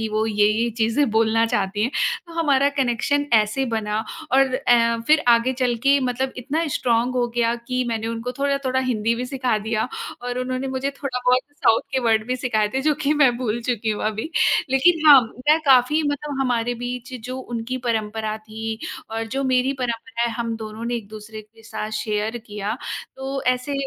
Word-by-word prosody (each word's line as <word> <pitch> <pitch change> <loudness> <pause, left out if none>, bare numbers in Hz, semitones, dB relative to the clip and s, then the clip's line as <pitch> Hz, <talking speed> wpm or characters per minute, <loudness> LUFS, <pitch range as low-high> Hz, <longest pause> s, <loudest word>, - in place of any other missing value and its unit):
कि 220 - -1
वो 215 +1 0
ये-ये 215 +2 +2
चीज़ें 230 +6 +2
बोलना 225 +1 +3
चाहती 205 -1 -1
हैं। 230 - +2 0.4
तो 340 - -12
हमारा 285 -4 +3
कनेक्शन 280 +1 0
ऐसे 215 +5 +3
बना 220 -3 -2 0.4
और 265 -1 +4
ऐ 235 -3 +3
फिर 310 0 +4
आगे 235 +2 +4
चल 250 -1 0
के 280 +1 +5
मतलब 260 +1 -1
इतना 290 +7 -2
स्ट्रांग 240 +1 +1
हो 245 -1 +1
गया 235 0 +2
कि 255 0 0
मैंने 225 -1 -2
उनको 230 +2 -4
थोड़ा-थोड़ा 275 -2 0
हिंदी 230 -3 0
भी 245 +2 -3
सिखा 255 -3 0
दिया 220 +2 -2 0.3
और 245 0 -3
उन्होंने 255 +1 -2
मुझे 265 +1 -2
थोड़ा 275 -2 -4
बहुत 250 +1 +5 0.2
साउथ 225 - +5
के 265 - +1
वर्ड 220 -2 +2
भी 250 +1 -1
सिखाए 220 -4 0
थे, 265 - +1
जो 305 +1 +3
कि 300 0 0
मैं 270 -5 +4
भूल 235 -2 -2
चुकी 230 -2 -1
हूँ 210 - -3
अभी। 220 +8 -3 0.4
लेकिन 310 +4 +3
हाँ, 280 -3 +10 0.3
मैं 310 - +6
काफ़ी 270 +4 +5
मतलब 285 -1 -3
हमारे 245 -2 0
बीच 250 +1 -5 0.2
जो 255 +1 -4
उनकी 240 0 -4
परंपरा 220 -1 -2
थी 220 +1 -6 0.3
और 225 0 -2
जो 275 - 0
मेरी 260 +1 +2
परंपरा 235 0 -3
है, 235 - +1
हम 230 -1 -3
दोनों 220 +1 -7
ने 240 - -1
एक-दूसरे 215 0 -9
के 225 +1 -22
साथ 215 -1 -5
शेयर 215 +2 -2
किया, 210 +1 -4 0.4
तो 270 +1 -4
ऐसे 255 +3 -6
245 Hz, 190 wpm, -22 LUFS, 225-265 Hz, 0.4 s, हाँ